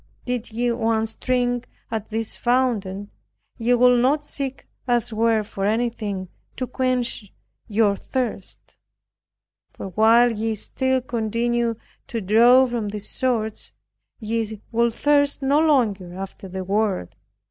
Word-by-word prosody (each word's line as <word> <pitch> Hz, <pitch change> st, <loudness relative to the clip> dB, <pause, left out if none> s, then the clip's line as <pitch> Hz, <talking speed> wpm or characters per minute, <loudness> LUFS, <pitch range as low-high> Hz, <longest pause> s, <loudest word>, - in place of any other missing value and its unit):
Did 245 Hz, -2 st, -3 dB
ye 240 Hz, +2 st, 0 dB
once 225 Hz, -1 st, 0 dB
drink 245 Hz, -1 st, 0 dB, 0.2 s
at 220 Hz, -2 st, -3 dB
this 225 Hz, 0 st, -1 dB
fountain, 215 Hz, -6 st, 0 dB, 0.5 s
ye 240 Hz, +2 st, +3 dB
would 250 Hz, 0 st, +5 dB
not 290 Hz, +4 st, +2 dB
seek 275 Hz, -2 st, -5 dB, 0.2 s
elsewhere 230 Hz, -2 st, +2 dB
for 200 Hz, -1 st, -6 dB
anything 210 Hz, -3 st, -1 dB, 0.3 s
to 255 Hz, -, -1 dB
quench 250 Hz, -5 st, -1 dB, 0.4 s
your 210 Hz, -2 st, +2 dB
thirst; 230 Hz, -3 st, -4 dB, 0.9 s
for 195 Hz, -, -8 dB
while 225 Hz, +5 st, +5 dB
ye 225 Hz, 0 st, -2 dB
still 260 Hz, +5 st, 0 dB
continue 235 Hz, 0 st, -1 dB, 0.3 s
to 230 Hz, -, -3 dB
draw 235 Hz, +6 st, +6 dB
from 235 Hz, -4 st, -2 dB
this 205 Hz, 0 st, -5 dB
source, 225 Hz, -4 st, -1 dB, 0.5 s
ye 220 Hz, -1 st, -2 dB
would 235 Hz, 0 st, +1 dB
thirst 285 Hz, -1 st, +2 dB
no 280 Hz, +2 st, +3 dB
longer 215 Hz, -, +2 dB
after 195 Hz, 0 st, -7 dB
the 190 Hz, 0 st, -5 dB
world. 195 Hz, -, 0 dB
230 Hz, 125 wpm, -23 LUFS, 210-245 Hz, 0.9 s, draw